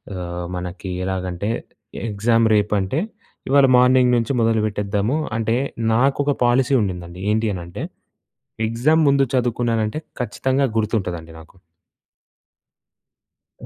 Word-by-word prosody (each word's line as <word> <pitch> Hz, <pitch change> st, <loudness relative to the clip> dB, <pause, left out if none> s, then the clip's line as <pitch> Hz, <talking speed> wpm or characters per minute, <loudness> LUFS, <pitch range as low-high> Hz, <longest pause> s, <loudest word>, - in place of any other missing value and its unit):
ఆహ్, 90 Hz, -1 st, -5 dB
మనకి 90 Hz, +1 st, -6 dB
ఎలాగంటే, 95 Hz, +1 st, -3 dB, 0.6 s
ఎగ్జామ్ 115 Hz, +3 st, +2 dB
రేపంటే 105 Hz, +3 st, +1 dB, 0.5 s
ఇవాళ 140 Hz, 0 st, +6 dB
మార్నింగ్ 125 Hz, 0 st, +5 dB
నుంచి 115 Hz, +3 st, -1 dB
మొదలుపెట్టేద్దాము, 110 Hz, +1 st, 0 dB, 0.2 s
అంటే, 115 Hz, 0 st, 0 dB, 0.4 s
నాకొక 140 Hz, +4 st, +2 dB
పాలసీ 125 Hz, +2 st, +2 dB
ఉండిందండి. 90 Hz, -2 st, -4 dB
ఏంటి 110 Hz, +1 st, +1 dB
అనంటే, 85 Hz, -1 st, -7 dB, 0.8 s
ఎగ్జామ్ 130 Hz, +9 st, +2 dB
ముందు 140 Hz, 0 st, +4 dB
చదువుకున్నానంటే, 120 Hz, 0 st, 0 dB, 0.2 s
ఖచ్చితంగా 130 Hz, +2 st, 0 dB
గుర్తుంటదండి 90 Hz, -7 st, -2 dB
నాకు. 80 Hz, +3 st, -17 dB, 2.1 s
ఆ! -, -, -7 dB
110 Hz, 95 wpm, -21 LUFS, 95-125 Hz, 2.1 s, ఇవాళ